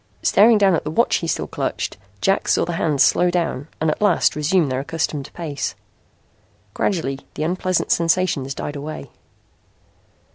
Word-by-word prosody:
Staring 220 +2 +5
down 195 -2 +4
at 165 - 0
the 150 - -4
watch 200 +10 +2
he 165 - -4
still - - -1
clutched, - - -3 0.3
Jack 195 - +1
saw - - +2
the 175 - -3
hands 155 -4 +2
slow 180 - +3
down 170 -5 -2
and 160 0 +1
at - - -5
last 210 - +3
resume 155 +2 +2
their 130 -1 -1
accustomed 150 -1 -3
pace. 155 -5 -4 1.0
Gradually 150 -9 -1 0.2
the 155 - -2
unpleasant 185 +2 0
sensations 165 -5 +1
died 145 - -5
away. 150 +2 -7
165 Hz, 155 wpm, -21 LUFS, 145-185 Hz, 1.0 s, Staring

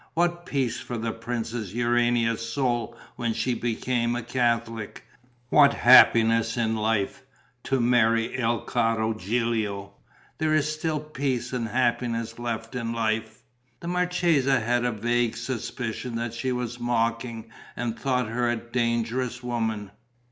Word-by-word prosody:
What 175 +1 0
peace 135 -4 -1
for 120 - -5
the 115 0 -2
Princess 115 -2 -4
Urania's 120 -1 +1
soul 120 -3 -1 0.2
when 115 -2 -1
she 125 - 0
became 120 0 -1
a 120 - -3
Catholic! 115 -3 -1 0.5
What 145 0 +6
happiness 115 -2 +6
in 115 -1 +1
life, 110 +3 0 0.4
to 135 -1 +1
marry 115 -1 +2
il 120 -2 0
caro 115 -2 0
Gilio! 105 -1 -2 0.5
There 155 0 +2
is 155 0 +1
still 155 0 -2
peace 135 -5 -3
and 120 -3 -1
happiness 115 -1 -1
left 115 -1 -4
in 115 -2 -3
life." 110 -1 -2 0.4
The 170 - -8
marchesa 175 -7 +2
had 120 +2 0
a 125 - +1
vague 120 +1 0
suspicion 120 0 -4
that 115 0 -3
she 130 +2 -2
was 125 -1 -3
mocking 115 -1 -1 0.2
and 120 -2 -2
thought 125 -2 0
her 120 +2 0
a 120 - +1
dangerous 120 +1 -1
woman. 110 -4 -2
120 Hz, 135 wpm, -26 LUFS, 115-125 Hz, 0.5 s, What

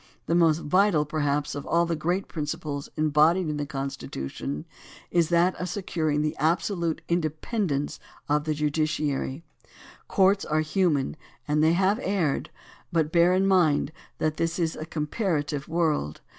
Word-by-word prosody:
The - - 0
most 165 -2 +4
vital 180 -1 +3
perhaps 145 -1 -1
of 145 - -5
all 170 +1 +3
the 170 0 -1
great 175 +5 -1
principles 150 -2 -4
embodied 155 +3 +3
in 150 - -2
the 145 -1 -3
Constitution 135 - -5 0.5
is 170 -2 +2
that 175 +2 +3
of 180 - -2
securing 160 -6 -1
the 155 - -1
absolute 165 +2 0
independence 155 -1 -1 0.3
of 150 +1 +1
the 155 -1 0
judiciary. 150 -1 -1 0.6
Courts 195 +1 +3
are 155 0 +1
human 155 -3 +1 0.3
and 150 +1 +2
they 160 +1 +5
have 195 +5 +2
erred, 185 - 0 0.4
but 160 -2 +1
bear 175 +2 +4
in 190 +1 +2
mind 165 -7 +3 0.3
that 155 -1 -1
this 165 0 -1
is 165 -3 0
a 155 - -6
comparative 150 -3 -2
world. 155 - 0
155 Hz, 145 wpm, -26 LUFS, 150-175 Hz, 0.6 s, they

